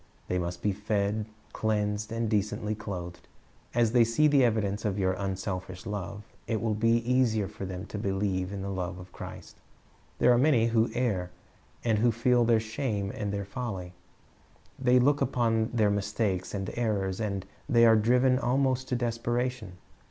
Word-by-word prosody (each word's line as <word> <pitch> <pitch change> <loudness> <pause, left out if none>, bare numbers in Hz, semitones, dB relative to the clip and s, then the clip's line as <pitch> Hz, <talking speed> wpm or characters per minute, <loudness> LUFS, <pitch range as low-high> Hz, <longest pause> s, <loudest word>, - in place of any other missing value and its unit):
They 90 - +1
must 85 0 -4
be 105 - +2
fed, 105 +1 -1 0.3
cleansed, 105 -1 -1
and 115 0 -1
decently 105 0 0
clothed. 90 -5 -7 0.5
As 120 -2 +3
they 120 -1 +6
see 115 +7 +3
the 140 -3 +4
evidence 110 -4 +1
of 105 -2 -1
your 95 -1 +1
unselfish 95 -1 -4
love, 105 0 -5 0.2
it 110 -2 0
will 110 0 0
be 115 +2 +2
easier 120 -5 +2
for 100 -1 -7
them 90 +1 -6
to 105 - -6
believe 95 -2 -1
in 100 -1 -5
the 100 - -3
love 90 -2 -3
of 90 0 -11
Christ. - - -9 0.6
There 125 - +5
are 120 - +3
many 130 -5 +4
who 115 0 +2
err, 100 -8 0 0.5
and 110 -3 +2
who 120 +2 +4
feel 120 +1 +3
their 115 -1 +4
shame 110 -3 -2
and 105 -2 -3
their 100 -1 -3
folly 95 -5 -5 0.9
They 125 -1 +4
look 140 +3 +3
upon 115 -3 +1
their 110 -4 +2
mistakes 100 -2 -1
and 95 -1 -3
errors 100 -5 -1
until 100 -4 -3 0.2
they 115 -3 +6
are 115 -1 +7
driven 125 +4 +3
almost 130 0 +1
to 125 - +1
desperation. 120 -2 -2
110 Hz, 170 wpm, -28 LUFS, 100-120 Hz, 0.9 s, are